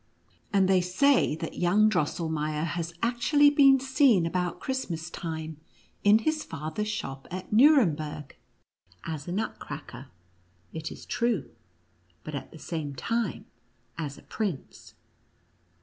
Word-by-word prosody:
And 195 -2 +3
they 190 -1 +4
say 190 - +3
that 160 0 -6
young 200 +5 +4
Drosselmeier 155 -4 -1
has 170 +1 -3
actually 285 +5 +4
been 275 -2 +6
seen 260 - +3
about 180 +1 -2
Christmas 180 -11 -4
time 160 -2 -5 0.5
in 205 +1 +7
his 310 +7 -1
father's 160 +7 -4
shop 135 -11 -5
at 185 +3 -6
Nuremberg, 160 - +3 0.7
as 155 -2 -5
a - - -4
Nutcracker, 205 +5 -5 0.7
it 160 -1 -5
is - - -10
true, 235 - -1 0.7
but, 155 - -7
at 140 - -6
the - - -11
same 155 -3 -5
time, 230 - -2 0.5
as 145 -4 -5
a - - -15
prince. 200 -11 -5
180 Hz, 125 wpm, -28 LUFS, 155-230 Hz, 0.7 s, in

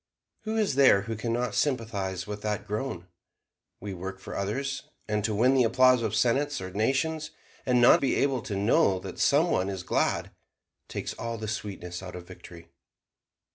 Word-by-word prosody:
Who 220 +1 -2
is 215 -7 +1
there 130 -8 +5
who 115 +1 -4
can 115 +2 -3
not 120 -1 -1
sympathize 100 -9 -1
with 105 0 -6
that 105 -1 -2
groan? 105 -4 -4 0.7
We 100 0 -6
work 95 +2 -6
for - - -8
others; 135 +8 -2 0.3
and 105 -1 -1
to 105 0 0
win 125 +5 +4
the 130 -2 +4
applause 130 +1 +4
of 110 -2 -1
senates 135 +6 +1
or 95 0 -6
nations, 140 - 0 0.4
and 125 -1 +4
not 120 - +6
be 135 - +1
able 135 -3 +1
to 105 - -5
know 100 -1 +3
that 95 -1 -8
Some 155 +4 +3
One 95 +1 +1
is 95 -2 -5
glad, - - 0 0.6
takes - - -4
all 115 0 -5
the 110 0 -5
sweetness 100 -5 -5
out 90 -1 -8
of 90 -1 -9
victory. 85 -2 -13
110 Hz, 180 wpm, -27 LUFS, 95-130 Hz, 0.7 s, not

